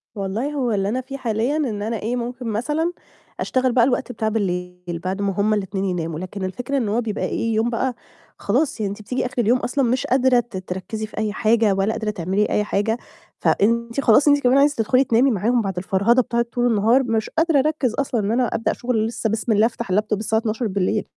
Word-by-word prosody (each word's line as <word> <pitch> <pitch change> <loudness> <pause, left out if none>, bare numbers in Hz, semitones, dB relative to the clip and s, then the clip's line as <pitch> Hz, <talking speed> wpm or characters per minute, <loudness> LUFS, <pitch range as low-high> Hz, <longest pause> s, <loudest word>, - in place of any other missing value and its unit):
والله 205 +8 -2
هو 255 -5 0
اللي 200 -1 0
أنا 255 +3 -1
فيه 270 +2 -7
حاليًا، 235 +4 -1
إن 225 -9 -2
أنا 225 +1 -2
إيه 230 +4 -2
ممكن 245 0 -4
مثلًا 295 +10 -1 0.5
أشتغل 255 -1 +1
بقى 240 -1 +4
الوقت 250 0 0
بتاع 220 -3 -1
بالليل. 180 -4 -3
بعد 190 +2 -2
ما 200 -1 0
هُم 215 +1 +3
ال2 195 -1 -2
يناموا، 165 -4 -2
لكن 185 +2 -6
الفكرة 245 +8 -3
إن 230 -5 0
هو 225 +4 +1
بيبقى 220 -2 -3
إيه؟ 230 -1 -1
يوم 225 +2 +1
بقى 245 +1 -1 0.4
خلاص، 255 +4 0
يعني 205 -2 -1
أنتِ 205 - -8
بتييجي 250 +5 -2
آخر 255 - -6
اليوم 240 +3 +3
أصلًا 275 +2 -1
مش 250 +1 0
قادرة 260 -1 +4
ت 235 -4 -5
تركّزي 185 +4 -5
في 215 - -15
أي 215 -1 -1
حاجة، 220 -2 +3
ولا 195 +3 +1
قادرة 220 -1 -3
تعملي 195 +2 0
أي 210 - +1
حاجة، 210 +2 0 0.4
فأنتِ 235 +4 +1
خلاص 270 +4 +5
أنتِ 290 0 +5
كمان 250 +2 +4
عايزة 290 +1 +4
تدخلي 250 +4 +3
تنامي 250 +2 +3
معاهم، 230 +4 +1
بعد 195 -4 -4
الفرهدة 200 +7 +2
بتاعة 235 0 -1
طول 245 +1 0
النهار، 230 +4 +3
مش 225 -3 -1
قادرة 325 -3 +2
أركّز 290 -4 0
أصلًا، 260 -4 -1
إن 205 +2 -1
أنا 245 +1 +2
أبدأ 225 - -1
شُغل 235 -3 -1
لسه، 225 -1 -2
بسم 220 +2 -1
الله، 215 +1 +4
أفتح 230 -3 -3
الLaptop 210 +2 +1
24:00 215 -2 -1
225 Hz, 210 wpm, -22 LUFS, 205-250 Hz, 0.5 s, خلاص